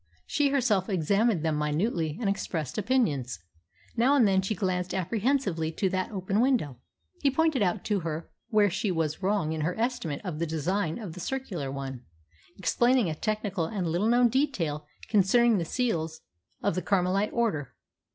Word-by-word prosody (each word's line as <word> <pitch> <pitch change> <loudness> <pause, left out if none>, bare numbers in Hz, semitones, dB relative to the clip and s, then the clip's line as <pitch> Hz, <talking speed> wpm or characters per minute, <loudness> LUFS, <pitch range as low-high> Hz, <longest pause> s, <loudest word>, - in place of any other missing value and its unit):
She 290 -1 +1
herself 235 -9 +1
examined 195 +1 +2
them 155 -2 +1
minutely 155 +1 0
and 230 - -1
expressed 175 - -2
opinions. 180 - 0 0.6
Now 250 +5 +4
and 245 -7 +5
then 190 -1 +3
she 195 +3 -2
glanced 180 -1 -1
apprehensively 195 - 0
to 190 +3 0
that 185 0 -1
open 195 -1 -1
window. 220 - +1 0.4
He 280 - +4
pointed 315 -2 +2
out 185 0 +1
to 210 -2 0
her 160 -1 -4 0.2
where 210 -4 +4
she 205 +3 -1
was 160 -3 -1
wrong 190 -5 +1
in 160 - -3
her 175 +7 -2
estimate 225 - -1
of 165 -5 -4
the 170 - 0
design 160 +2 -1
of 205 -8 -7
the 180 - -9
circular 180 - -3
one, 135 -2 -5 0.6
explaining 240 +1 +2
a - - -1
technical 205 0 -2
and 190 +1 -3
little 175 +6 +1
known 240 +1 +5
detail 185 - -1 0.2
concerning 220 +2 +4
the 170 - -2
seals 160 -8 -1 0.4
of 200 - +2
the 185 - -1
Carmelite 195 +2 +1
order. 190 - -1
190 Hz, 170 wpm, -28 LUFS, 160-230 Hz, 0.6 s, and